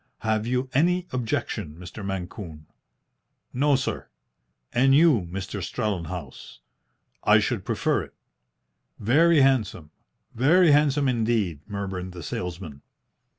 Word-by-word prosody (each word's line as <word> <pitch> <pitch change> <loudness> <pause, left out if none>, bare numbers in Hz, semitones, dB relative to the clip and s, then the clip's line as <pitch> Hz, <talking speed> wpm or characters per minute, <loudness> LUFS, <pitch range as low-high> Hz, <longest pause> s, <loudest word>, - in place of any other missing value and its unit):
Have 110 0 0
you 125 +1 0
any 180 +5 +2
objection, 115 -10 -3
Mr. 90 +4 -9
Mancune?" 90 -4 -6 0.9
"No, 140 +3 +3
sir." 130 - -3 0.7
"And 135 +2 +4
you, 145 - +4
Mr. 100 +1 -5
Strellenhaus?" 90 - -5 0.7
"I - - +6
should - - -1
prefer - - 0
it." - - -22 0.8
"Very 150 +8 +4
handsome! 110 - +1 0.4
Very 160 +7 +4
handsome 145 -1 +3
indeed!" 110 - 0
murmured 95 -3 -5
the 85 -2 -8
salesman. 85 -5 -6
110 Hz, 110 wpm, -25 LUFS, 90-135 Hz, 0.9 s, I